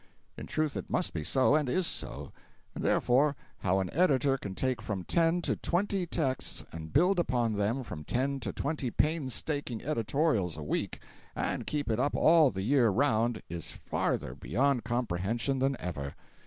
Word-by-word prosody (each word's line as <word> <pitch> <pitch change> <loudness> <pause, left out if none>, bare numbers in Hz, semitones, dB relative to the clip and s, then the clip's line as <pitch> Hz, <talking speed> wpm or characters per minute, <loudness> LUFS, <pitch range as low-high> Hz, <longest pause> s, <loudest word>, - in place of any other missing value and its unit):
In - - -8
truth 155 -4 -1
it 100 - -5
must - - 0
be 75 - -3
so, 130 - +3
and 150 -3 +2
is 185 +6 +1
so; - - -3 0.4
and - - -5
therefore, 140 +4 +3 0.2
how 95 0 +1
an 95 -2 -3
editor 140 -5 +3
can 100 -7 -6
take 130 0 -1
from 105 -4 -3
ten 170 - +2
to - - +1
twenty 190 0 0
texts 135 -6 -1
and 80 -1 -8
build 180 +5 +4
upon 120 -8 +1
them 105 +6 0
from 75 -10 -7
ten 135 - -1
to 120 - -3
twenty 145 -3 -2
painstaking 145 -3 -1
editorials 115 - 0
a 75 - -5
week 75 - -2 0.3
and - - -2
keep 150 -1 -1
it 110 0 0
up 140 +3 +1
all 160 -3 +6
the 95 -3 -4
year 125 0 +4
round, 115 0 +1
is 85 -1 -5
farther - - -2
beyond 125 - 0
comprehension 120 +3 -1
than 135 0 +1
ever. 70 -6 -5
130 Hz, 170 wpm, -30 LUFS, 105-150 Hz, 0.4 s, all